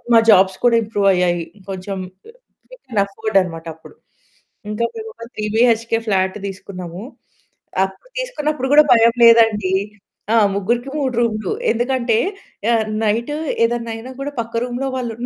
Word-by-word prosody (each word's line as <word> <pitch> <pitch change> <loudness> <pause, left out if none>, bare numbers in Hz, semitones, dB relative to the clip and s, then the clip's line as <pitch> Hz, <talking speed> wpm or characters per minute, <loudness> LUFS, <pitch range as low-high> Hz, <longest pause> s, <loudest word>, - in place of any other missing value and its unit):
మా - - +9
జాబ్స్ 190 0 +4
కూడా 240 -1 +5
ఇంప్రూవ్ 205 -2 0
అయ్యాయి. 175 -2 +1 0.2
కొంచెం 195 +1 -5 0.3
ఆహ్, - - -27 0.3
వీ - - -10
కెన్ 220 -5 +1
అఫోర్డ్ 205 +1 -2
అనమాట 165 -2 -8
అప్పుడు. 160 - -16 0.7
ఇంకా 210 +2 -1
మేమొక 445 - -8
త్రీ 215 - -3
బీహెచ్‌కే 230 -1 +3
ఫ్లాట్ 190 -2 +1
తీసుకున్నాము. 185 -1 -8 0.8
అప్పుడు 190 - -12
తీసుకున్నప్పుడు 305 - -2
కూడా 300 +1 +8
భయం 230 0 +5
లేదండి. 225 -4 +5 0.6
ఆ! - - +4 0.2
ముగ్గురికి 235 +6 -1
3 265 -3 -1
రూములు. 220 - -1 0.2
ఎందుకంటే 240 -1 0 0.6
ఆహ్, 220 -2 +2 0.2
నైటు 230 +7 0 0.3
ఏదన్నా 235 0 -2
అయినా 230 +3 -8
కూడా, 285 +1 -3
పక్క 230 0 -10
రూమ్‌లో 250 +2 -3
వాళ్ళున్నరు 240 -1 -4
225 Hz, 140 wpm, -19 LUFS, 195-245 Hz, 0.8 s, మా